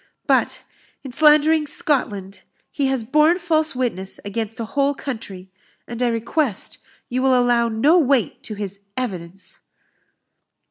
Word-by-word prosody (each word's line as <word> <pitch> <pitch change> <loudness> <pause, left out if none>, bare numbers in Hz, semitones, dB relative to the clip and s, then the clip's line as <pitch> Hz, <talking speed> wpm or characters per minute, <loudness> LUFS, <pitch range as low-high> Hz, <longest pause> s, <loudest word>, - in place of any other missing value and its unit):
But, - - +1 0.4
in 270 - -7
slandering 305 +2 +4
Scotland, 205 -10 -1 0.3
he 280 -2 0
has 265 -3 0
borne 305 +8 +3
false 315 -5 +1
witness 225 -7 -3
against 220 +2 -4
a 230 - -3
whole 280 +4 0
country; 220 -8 -7 0.4
and 235 +1 -6
I 250 - +3
request 235 +1 -2 0.3
you 255 +1 -2
will 260 -1 +4
allow 240 -1 +2
no 280 +11 +4
weight 275 -6 +1
to 215 - -5
his 200 -1 -5 0.2
evidence." 190 -6 -6
245 Hz, 135 wpm, -21 LUFS, 215-290 Hz, 0.4 s, slandering